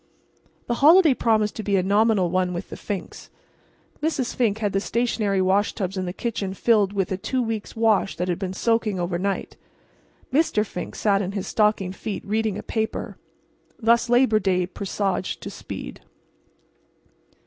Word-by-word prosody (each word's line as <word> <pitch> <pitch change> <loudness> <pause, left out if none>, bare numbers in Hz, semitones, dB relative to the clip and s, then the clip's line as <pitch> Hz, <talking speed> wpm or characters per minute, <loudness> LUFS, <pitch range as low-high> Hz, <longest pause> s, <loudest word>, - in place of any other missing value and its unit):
The 240 - -1
holiday 320 0 +7
promised 220 -4 +1
to - - -2
be 200 0 +1
a 185 - +2
nominal 200 -2 +3
one 185 -1 +1
with 175 - -6
the - - -5
Finks. 200 -3 -6 0.7
Mrs. 295 -5 -1
Fink 220 -5 +1
had 210 -3 -1
the 195 - +2
stationary 210 -3 0
washtubs 195 0 0
in 185 -1 -2
the - - -2
kitchen 200 -2 -3
filled 210 -3 +3
with 195 -2 -1
a 190 - 0
two 255 +7 -2
weeks' 225 -3 -3
wash 220 -3 +2
that 180 - -2
had 175 -1 -1
been 190 -2 -3
soaking 220 -2 0
overnight. 175 +3 -2 0.8
Mr. 270 -8 +2
Fink 180 - -6
sat 200 -2 +2
in 195 0 -3
his 195 -2 -3
stockinged 210 -3 +1
feet 215 0 -5
reading 215 0 0
a 210 - -7
newspaper. 220 -1 -3 0.6
Thus 235 +1 +3
Labor 245 -3 +4
Day 185 -3 +1
presaged 195 0 -3
to - - -6
speed. - - -8
205 Hz, 160 wpm, -24 LUFS, 190-225 Hz, 0.8 s, holiday